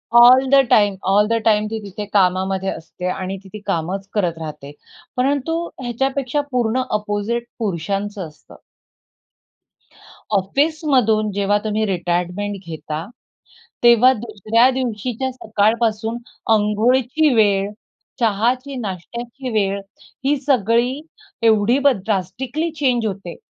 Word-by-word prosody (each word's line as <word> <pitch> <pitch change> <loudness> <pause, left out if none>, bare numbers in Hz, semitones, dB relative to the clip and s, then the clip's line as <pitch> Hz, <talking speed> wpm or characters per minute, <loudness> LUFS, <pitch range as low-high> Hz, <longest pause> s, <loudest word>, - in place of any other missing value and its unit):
All 250 +2 +8
the 275 - +5
time, 205 -2 +4
all 200 +2 +4
the 230 - 0
time 210 -1 +3
ती 225 - -2
तिथे 200 +1 -6
कामामध्ये 190 0 +2
असते 180 +2 -6
आणि 190 +1 -4
ती 195 - -14
ते 210 - -6
कामच 190 +2 -2
करत 175 -6 0
राहते. 150 -3 -8 0.5
परंतु 285 +5 +1 0.2
ह्याच्यापेक्षा 270 +3 -1
पूर्ण 250 0 +1
अपोझिट 210 +3 -2
पुरुषांचं 200 0 -3
असतं. 150 -1 -17 1.8
ऑफिसमधून 250 - +1
जेव्हा 200 +1 +1
तुम्ही 215 0 0
रिटायरमेंट 180 +2 -2
घेता, 160 0 -5 0.8
तेव्हा 240 +2 +7
दुसऱ्या 225 +2 +2
दिवशीच्या 255 0 -2
सकाळपासून 220 0 0 0.4
अंघोळीची 245 +7 +2
वेळ, 200 -3 +3 0.5
चहाची 245 +5 0
नाश्त्याची 235 +5 -6
वेळ 200 -3 0 0.4
ही 285 +2 +3
सगळी 250 0 +1 0.5
एवढी 220 +3 +4
बद 275 -7 +3
ड्रास्टिकली 240 - -2
चेंज 250 -6 +1
होते. 195 -4 -5
215 Hz, 110 wpm, -20 LUFS, 195-250 Hz, 1.8 s, All